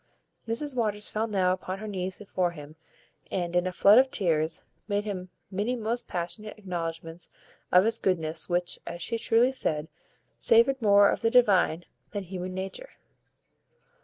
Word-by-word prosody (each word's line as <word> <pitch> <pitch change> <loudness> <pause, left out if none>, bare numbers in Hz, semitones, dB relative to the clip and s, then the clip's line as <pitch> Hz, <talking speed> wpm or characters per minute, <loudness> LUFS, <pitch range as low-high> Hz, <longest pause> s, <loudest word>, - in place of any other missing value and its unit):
Mrs 255 +5 -2
Waters 210 -3 -1
fell 220 +1 -1
now 190 -4 +2
upon 185 0 -5
her 215 +2 -7
knees 185 -2 -3
before 185 -3 -1
him, 150 -2 -11 0.5
and, 175 -2 -2
in 180 +1 +2
a - - -2
flood 200 +5 +6
of 265 0 +3
tears, 165 - 0 0.2
made 205 0 -1
him 185 -3 -5 0.2
many 205 +6 -1
most 235 +1 -2
passionate 195 +5 -5
acknowledgments 165 -3 -5 0.4
of 180 +2 +6
his 225 0 +1
goodness, 165 -3 -1
which, 175 0 -1
as 175 - -6
she 230 +3 -2
truly 235 +3 +3
said, 155 - -1 0.5
savoured 235 +4 +4
more 200 -1 +6
of - - -3
the 225 - +2
divine 195 -8 +3 0.3
than 205 -2 -3
human 185 0 -6
nature. 195 - -5
195 Hz, 160 wpm, -27 LUFS, 175-225 Hz, 0.5 s, flood